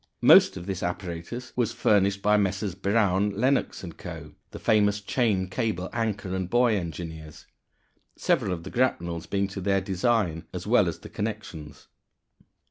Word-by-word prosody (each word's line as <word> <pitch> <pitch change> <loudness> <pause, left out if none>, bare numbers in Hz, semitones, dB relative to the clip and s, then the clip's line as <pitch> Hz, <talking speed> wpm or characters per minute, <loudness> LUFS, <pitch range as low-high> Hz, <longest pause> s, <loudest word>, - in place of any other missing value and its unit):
Most - - +7
of 85 - -7
this 95 -2 -4
apparatus 90 +7 -5
was 120 -2 0
furnished 100 -1 +2
by 105 0 +4
Messrs. 100 -1 0
Brown, 100 0 +1
Lenox 130 -5 +1
& - - -20
Co., 80 -4 -8 0.2
the - - -9
famous 105 -1 +2
chain, 105 -3 0
cable, 95 -3 -2
anchor, 110 -5 -2
and 95 -2 -3
buoy 120 -1 +3
engineers, 80 -3 -6 0.7
several 95 - +1
of 85 -2 -4
the 95 - -8
grapnels 85 -9 -1
being 100 0 0
to 95 0 -6
their 95 +1 +2
design, 95 -3 0
as - - -5
well - - +4
as - - -3
the - - -12
"connections." 75 -2 -6
95 Hz, 155 wpm, -26 LUFS, 85-105 Hz, 0.7 s, Most